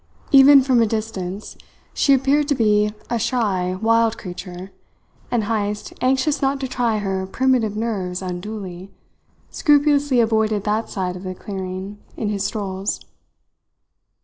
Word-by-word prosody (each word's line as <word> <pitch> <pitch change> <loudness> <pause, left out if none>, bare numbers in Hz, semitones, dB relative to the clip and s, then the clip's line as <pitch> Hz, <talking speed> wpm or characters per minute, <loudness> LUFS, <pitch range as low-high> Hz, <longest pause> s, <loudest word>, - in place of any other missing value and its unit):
Even 275 0 +8
from 255 -3 +3
a 225 - +3
distance 210 -3 -4 0.4
she 280 - +2
appeared 275 +2 +2
to 290 - +1
be 210 -3 +2 0.2
a 235 - +1
shy, 205 -6 0
wild 230 0 +3
creature, 180 0 -8 0.6
and 235 -3 0
Heyst, 210 -1 -2
anxious 265 +3 +1
not 275 0 +1
to 265 - -2
try 240 -3 0
her 190 -2 -2
primitive 240 -2 +1
nerves 195 -5 -3
unduly, 185 0 -6 0.6
scrupulously 290 -3 +3
avoided 220 -2 +1
that 215 +2 -1
side 180 -2 -3
of 180 - -8
the 185 -1 -6
clearing 190 +1 -6 0.2
in 210 - -2
his 200 -2 -2
strolls. 200 -1 -3
215 Hz, 135 wpm, -21 LUFS, 190-245 Hz, 0.6 s, Even